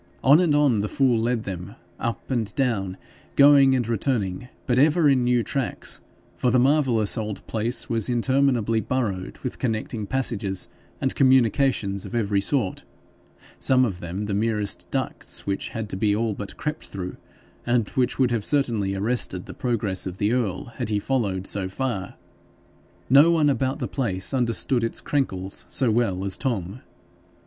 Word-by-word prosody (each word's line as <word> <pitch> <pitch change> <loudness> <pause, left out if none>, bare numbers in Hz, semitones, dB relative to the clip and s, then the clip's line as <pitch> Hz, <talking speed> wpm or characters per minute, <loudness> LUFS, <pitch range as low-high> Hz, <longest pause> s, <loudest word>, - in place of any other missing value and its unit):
On 140 +4 +7
and 170 -5 +3
on 140 -7 +3
the 105 +1 -1
fool 130 -5 +2
led 120 0 0
them, 90 -4 -7 0.2
up 115 +3 -4
and 110 -5 -1
down, 100 -8 -1 0.4
going 140 -1 +7
and 120 -3 0
returning, 115 -3 -1 0.2
but 125 -2 +2
ever 155 +2 +4
in 135 -3 +3
new 120 -1 +2
tracks, 135 0 -3 0.3
for 125 - +1
the 125 - +3
marvellous 125 -5 +2
old 105 -2 -5
place 115 +2 -1
was 115 -2 -1
interminably 120 -2 +2
burrowed 105 -9 -2
with 125 - -5
connecting 110 -3 -2
passages 105 -6 -1 0.3
and 135 - 0
communications 130 -6 +2
of - - -7
every 100 -3 +1
sort 105 -3 -1 0.8
some 130 -1 +4
of 95 -6 -4
them 90 +4 -4
the 105 - -3
merest 105 0 0
ducts - - -3
which 100 0 -2
had 110 -2 -5
to - - -3
be 105 +1 +1
all 110 0 0
but 100 0 -7
crept 155 +1 -4
through, 90 -2 -6 0.5
and 120 -3 +1
which 125 -1 0
would 130 -2 +2
have 115 -3 0
certainly 115 -8 +1
arrested 100 -3 -1
the - - -9
progress 105 -7 -1
of 90 0 -6
the 105 +2 +1
earl 120 -1 -1
had 120 -4 -3
he 105 - +1
followed 100 -5 -1
so 95 -2 -1
far: 100 -3 -3 0.9
no 140 +5 +7
one 155 -4 +3
about 130 +1 -1
the - - -3
place 95 -8 -1
understood 120 0 +1
its 115 - -1
"crenkles" 95 -10 -2
so 130 -5 +1
well 100 -5 0
as 95 - 0
Tom. 110 -2 -3
115 Hz, 165 wpm, -24 LUFS, 100-130 Hz, 0.9 s, On